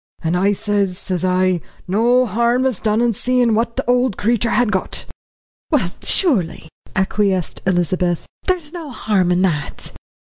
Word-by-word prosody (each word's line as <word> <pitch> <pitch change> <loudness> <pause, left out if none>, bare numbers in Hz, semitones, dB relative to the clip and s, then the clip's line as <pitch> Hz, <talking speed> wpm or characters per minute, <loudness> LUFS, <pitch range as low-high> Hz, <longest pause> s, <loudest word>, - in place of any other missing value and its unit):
"And 165 +2 0
I 195 +3 +3
sez, 200 -3 -1
sez 185 -3 -3
I, 185 -1 +2 0.3
no 240 +6 +3
harm 235 +4 +1
is 255 -7 0
done 215 +1 +1
in 240 -1 +2
seein' 245 +1 +1
what 230 +2 0
the 265 - -3
old 250 -3 +2
creetur 235 +1 +1
had 240 -2 +2
got." 190 - -2 0.6
"Well, - - +1
surely," 185 - +1 0.3
acquiesced 190 -2 0
Elizabeth, 175 -1 +1 0.2
"there 370 -1 +3
is 310 -3 -16
no 335 -4 -6
harm 205 -7 0
in 180 +1 +2
that." 155 -6 -2
210 Hz, 155 wpm, -19 LUFS, 185-245 Hz, 0.6 s, I